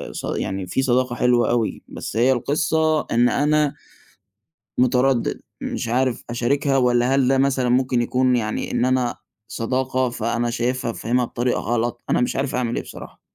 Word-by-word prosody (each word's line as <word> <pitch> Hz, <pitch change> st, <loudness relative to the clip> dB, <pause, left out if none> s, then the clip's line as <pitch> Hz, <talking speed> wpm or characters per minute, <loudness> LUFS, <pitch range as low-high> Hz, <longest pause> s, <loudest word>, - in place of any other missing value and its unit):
ص -, -, -5 dB
يعني 95 Hz, -1 st, -3 dB
في 130 Hz, -, 0 dB
صداقة 130 Hz, -1 st, +1 dB
حلوة 120 Hz, -2 st, +2 dB
أوي، 120 Hz, -2 st, -1 dB
بس -, -, -6 dB
هي 125 Hz, +3 st, +4 dB
القِصّة 155 Hz, +4 st, +1 dB
إن 120 Hz, +1 st, +4 dB
أنا 150 Hz, 0 st, +1 dB, 1.0 s
مُتردِّد 125 Hz, 0 st, +2 dB, 0.2 s
مش -, -, -4 dB
عارف 125 Hz, +1 st, 0 dB
أشاركها 135 Hz, +4 st, +1 dB
والَّا 125 Hz, 0 st, +2 dB
هل 135 Hz, -2 st, +3 dB
ده 135 Hz, 0 st, +3 dB
مثلًا 135 Hz, -2 st, +1 dB
ممكن 125 Hz, 0 st, +2 dB
يكون 125 Hz, +1 st, +2 dB
يعني 110 Hz, -2 st, -2 dB
إن -, -, +1 dB
أنا 130 Hz, -2 st, +1 dB, 0.3 s
صداقة 130 Hz, +3 st, -1 dB
فأنا 115 Hz, 0 st, -1 dB
شايفها 120 Hz, 0 st, -1 dB
فاهمها 125 Hz, +2 st, 0 dB
بطريقة 120 Hz, +1 st, -1 dB
غلط، 120 Hz, +1 st, -2 dB
أنا -, -, +2 dB
مش 125 Hz, -, 0 dB
عارف 135 Hz, 0 st, -2 dB
أعمل 120 Hz, -2 st, -1 dB
إيه -, -, -2 dB
بصراحة. -, -, -11 dB
125 Hz, 160 wpm, -22 LUFS, 120-130 Hz, 1.0 s, هي